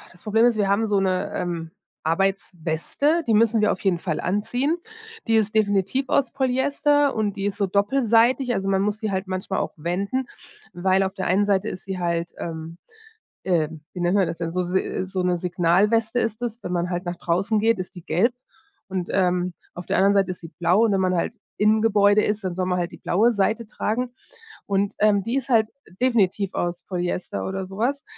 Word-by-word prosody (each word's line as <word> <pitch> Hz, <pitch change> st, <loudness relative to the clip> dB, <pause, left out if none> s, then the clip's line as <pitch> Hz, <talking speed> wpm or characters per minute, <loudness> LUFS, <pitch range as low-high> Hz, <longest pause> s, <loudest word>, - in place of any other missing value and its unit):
das 180 Hz, -, -18 dB
Problem 225 Hz, +2 st, +3 dB
ist, 240 Hz, -2 st, +4 dB
wir 200 Hz, -2 st, +1 dB
haben 210 Hz, +3 st, +2 dB
so 205 Hz, -2 st, +2 dB
'ne, 185 Hz, -1 st, 0 dB
ähm, 165 Hz, -2 st, -3 dB, 0.3 s
Arbeitsweste. 190 Hz, -, 0 dB
Die 220 Hz, -, +4 dB
müssen 225 Hz, 0 st, +4 dB
wir 210 Hz, -, +3 dB
auf -, -, -5 dB
jeden 185 Hz, -4 st, +1 dB
Fall 165 Hz, -3 st, -2 dB
anziehen. 245 Hz, -, 0 dB, 0.5 s
Die 225 Hz, -, +4 dB
ist 215 Hz, 0 st, +1 dB
definitiv 210 Hz, +5 st, +1 dB
aus 275 Hz, -, +2 dB
Polyester 280 Hz, +2 st, +2 dB
und 210 Hz, -2 st, -1 dB
die 195 Hz, -, -3 dB
ist 205 Hz, 0 st, -2 dB
so 200 Hz, -, +2 dB
doppelseitig. 235 Hz, +4 st, +2 dB
Also, 195 Hz, 0 st, -2 dB
man 195 Hz, 0 st, +2 dB
muss 210 Hz, +1 st, -1 dB
die 215 Hz, -2 st, -2 dB
halt 190 Hz, 0 st, -2 dB
manchmal 185 Hz, +1 st, -3 dB
auch -, -, -2 dB
wenden, 200 Hz, -, -2 dB, 0.5 s
weil 190 Hz, +2 st, +2 dB
auf 190 Hz, 0 st, -2 dB
der 190 Hz, -, -3 dB
einen 190 Hz, +3 st, +3 dB
Seite 200 Hz, 0 st, +1 dB
ist 185 Hz, -, -7 dB
sie 190 Hz, -1 st, -4 dB
halt, 170 Hz, -1 st, -1 dB
ähm, 165 Hz, 0 st, -6 dB, 0.7 s
äh, 165 Hz, -5 st, +1 dB, 0.2 s
wie 180 Hz, -, -7 dB
nennt 175 Hz, +3 st, +2 dB
man 190 Hz, -4 st, +3 dB
das 165 Hz, +1 st, -5 dB
denn? 165 Hz, -1 st, -3 dB
So 180 Hz, +1 st, -1 dB
se 185 Hz, +1 st, -1 dB
so 185 Hz, -1 st, -3 dB
'ne 180 Hz, -1 st, +1 dB
Signalweste 195 Hz, +7 st, +2 dB
ist 225 Hz, 0 st, -2 dB
das. 235 Hz, -1 st, -4 dB
Wenn 180 Hz, -, -4 dB
man 175 Hz, 0 st, -1 dB
halt 175 Hz, 0 st, -3 dB
nach 175 Hz, 0 st, -3 dB
draußen 195 Hz, +6 st, 0 dB
geht, 225 Hz, -2 st, +2 dB
ist 185 Hz, -, -6 dB
die 175 Hz, -, -10 dB
gelb 235 Hz, +9 st, +2 dB, 0.5 s
und, 185 Hz, -2 st, -3 dB
ähm, 180 Hz, -1 st, +1 dB, 0.2 s
auf 175 Hz, -, -6 dB
der -, -, 0 dB
anderen 195 Hz, +1 st, +4 dB
Seite 195 Hz, -2 st, +2 dB
ist 180 Hz, -, -8 dB
sie 165 Hz, -, -9 dB
blau. 180 Hz, +6 st, +4 dB
Und 210 Hz, -, +2 dB
wenn 190 Hz, -, +2 dB
man 185 Hz, -1 st, +1 dB
halt 225 Hz, +7 st, -1 dB, 0.2 s
im 215 Hz, +1 st, +3 dB
Gebäude 205 Hz, -1 st, +4 dB
ist, 210 Hz, 0 st, -1 dB
dann 180 Hz, -, -1 dB
soll 185 Hz, +1 st, -1 dB
man 180 Hz, -1 st, 0 dB
halt 175 Hz, 0 st, -2 dB
die -, -, -9 dB
blaue 220 Hz, +7 st, +2 dB
Seite 220 Hz, +3 st, 0 dB
tragen, 240 Hz, +4 st, -2 dB, 0.5 s
und, 200 Hz, 0 st, 0 dB
ähm, 205 Hz, -1 st, +4 dB
die 235 Hz, +4 st, -1 dB
ist 270 Hz, -1 st, -2 dB
halt 220 Hz, -3 st, +3 dB, 0.3 s
definitiv 205 Hz, -6 st, +2 dB
aus 175 Hz, 0 st, -2 dB
Polyester 180 Hz, -1 st, -3 dB
oder 190 Hz, 0 st, -3 dB
sowas, 235 Hz, +9 st, -2 dB
195 Hz, 210 wpm, -23 LUFS, 180-220 Hz, 0.7 s, ist